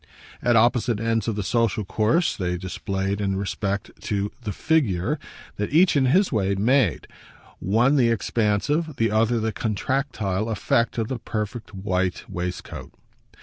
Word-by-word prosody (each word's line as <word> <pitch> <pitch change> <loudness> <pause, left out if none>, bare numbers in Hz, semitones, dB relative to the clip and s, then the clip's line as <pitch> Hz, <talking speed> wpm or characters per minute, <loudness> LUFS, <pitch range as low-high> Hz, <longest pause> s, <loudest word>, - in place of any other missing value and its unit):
At 120 -1 +3
opposite 120 -1 +3
ends 115 -1 0
of 115 - 0
the 105 - -2
social 110 0 0
course, 115 - +1
they 90 -2 -2
displayed, 95 +2 -3
in 95 -1 0
respect 100 0 -2
to 100 0 -1
the 110 -4 -4
"figure" 105 - +1 0.4
that 105 - -2
each, 170 +3 +5
in 135 -2 +3
his 185 +9 +3
way, 100 -5 +1
made, 110 - +2 0.5
one 120 +9 +3
the 120 -3 +4
expansive, 115 - 0
the 115 -3 +1
other 115 +2 +2
the 110 0 -1
contractile 110 -2 -1
effect 115 +2 0
of 115 -2 0
the 130 0 -4
perfect 110 -1 -5
white 95 -2 -1
waistcoat. 90 -1 -6
110 Hz, 150 wpm, -24 LUFS, 100-120 Hz, 0.5 s, each